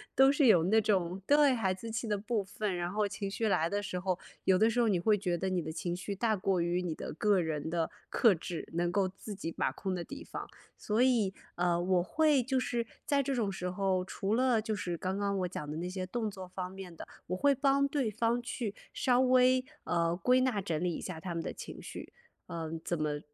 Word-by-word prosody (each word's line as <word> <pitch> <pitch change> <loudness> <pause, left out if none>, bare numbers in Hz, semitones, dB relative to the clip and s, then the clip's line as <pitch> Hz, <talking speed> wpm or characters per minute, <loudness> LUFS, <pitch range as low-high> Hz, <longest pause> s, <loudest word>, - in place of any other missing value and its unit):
都 270 +1 +7
是 285 -2 +4
有 175 -7 +6
那 220 +5 +4
种， 190 -3 0
对， 290 -1 +6
孩 215 -6 +1
子 205 +5 -5
气 225 +1 -3
的 210 -1 0
部 215 0 -1
分， 205 0 -3
然 175 0 -2
后 210 +1 +1
情 200 -1 -4
绪 220 +3 -1
来 165 -5 +2
的 205 +2 -1
时 185 -2 -3
候， 185 -1 -1 0.3
有 190 - +5
的 220 +4 +4
时 240 - 0
候 235 - +4
你 190 -4 +2
会 210 +4 +4
觉 180 -4 -1
得 190 +2 -1
你 180 -2 +1
的 160 - -5
情 170 +2 -3
绪 190 +3 -4
大 220 +2 +1
过 190 -1 0
于 175 +1 0
你 170 -3 -3
的 - - -6
个 200 +4 +3
人 160 -2 -2
的 165 -1 -1 0.2
克 225 -4 +5
制， 170 0 -5
能 175 +1 0
够 195 0 +2
自 195 +3 -8
己 180 -4 -4
把 - - 0
控 190 -2 -3
的 175 - -3
地 280 - -8
方。 - - -7 0.3
所 215 +2 -1
以， 235 -7 +3 0.2
呃， 175 -1 +1
我 180 0 +2
会 300 - +3
就 260 +2 0
是 235 -2 -1 0.2
在 285 -1 +2
这 275 0 -1
种 215 -5 0
时 180 -1 -3
候， 185 0 0
除 195 +2 -2
了 250 -1 +3
就 215 0 -2
是 175 -4 -3
刚 185 +3 -2
刚 200 0 0
我 180 - 0
讲 150 -4 -6
的 150 - -4
那 175 +2 -3
些 185 0 -4
动 220 +2 -2
作 190 -2 -8
方 180 0 -5
面 190 -3 -9
的， - - -8 0.2
我 180 +1 -2
会 285 +5 +4
帮 275 +1 +3
对 275 -5 0
方 230 +3 0
去 235 -3 -4 0.2
稍 250 -1 +2
微， 255 0 +5 0.2
呃， 170 -1 +1
归 250 +8 +3
纳 255 -5 +1
整 170 -4 -2
理 180 - +1
一 - - -5
下 180 -4 -6
他 170 +1 -5
们 165 - -2
的 - - -4
情 - - -8
绪。 - - -8 0.4
呃， 165 -1 -5
怎 170 -3 -2
么 150 -1 -1
195 Hz, 260 characters per minute, -31 LUFS, 180-230 Hz, 0.4 s, 都